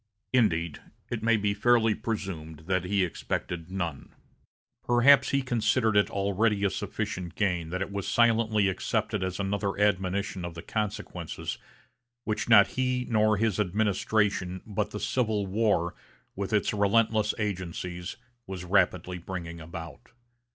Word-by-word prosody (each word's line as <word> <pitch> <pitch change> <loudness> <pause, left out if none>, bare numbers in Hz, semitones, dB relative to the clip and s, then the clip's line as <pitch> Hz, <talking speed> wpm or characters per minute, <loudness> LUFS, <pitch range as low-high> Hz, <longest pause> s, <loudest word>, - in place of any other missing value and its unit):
Indeed, 85 - +2 0.3
it 120 -2 -2
may 115 +1 +3
be 105 -1 0
fairly 115 +1 +3
presumed 85 -9 -5
that 95 0 0
he 100 0 +2
expected 85 0 -4
none. 85 -7 -4 0.7
Perhaps 130 +3 +5
he 140 -1 +1
considered 115 -2 +1
it 105 - +4
already 100 +1 +1
a 100 - +2
sufficient 90 +2 -4
gain 90 -5 0
that 95 +3 -2
it 95 - -8
was 100 -1 -3
silently 110 -3 +3
accepted 105 +2 -1
as 95 +1 -3
another 100 0 -1
admonition 95 -1 0
of 85 -1 -5
the 85 - -8
consequences 105 -2 -4 0.6
which 110 +2 -2
not 100 -3 +7
he 125 -1 -1
nor 110 -1 +3
his 110 -1 0
administration, 100 -2 0
but 105 -1 -2
the 105 - -6
Civil 110 -5 0
War, 95 -4 +1 0.4
with 100 +1 -3
its 105 -1 +1
relentless 110 +1 +2
agencies, 90 -3 -4 0.3
was 95 -2 -6
rapidly 90 -1 +1
bringing 85 -1 -6
about. 85 +6 -9
100 Hz, 135 wpm, -28 LUFS, 90-110 Hz, 0.7 s, not